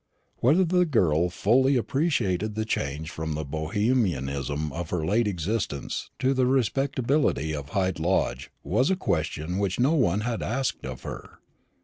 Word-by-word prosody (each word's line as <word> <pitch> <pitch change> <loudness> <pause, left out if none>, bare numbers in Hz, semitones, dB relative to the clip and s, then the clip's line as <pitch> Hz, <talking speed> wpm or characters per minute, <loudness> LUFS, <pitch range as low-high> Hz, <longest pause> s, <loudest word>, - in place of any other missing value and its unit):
Whether 160 +10 +4
the 180 +1 +2
girl 90 - +2
fully 125 +9 +3
appreciated 110 - 0
the 110 0 -1
change 75 -5 -3
from 80 -1 -4
the 75 0 -3
Bohemianism 75 - -1
of 85 -1 -4
her 80 -3 -1
late 110 +6 +2
existence 95 -5 -2
to 130 +1 +2
the 130 -1 +2
respectability 130 - +1
of 70 -2 -5
Hyde 95 -1 0
Lodge 90 +4 0
was 125 +8 +1
a 190 - +3
question 80 - -2
which 100 -1 -1
no 135 +6 +4
one 105 - +2
had 115 0 -2
asked 130 - -2
of 65 -1 -7
her. - - -8
100 Hz, 150 wpm, -26 LUFS, 80-130 Hz, -, Whether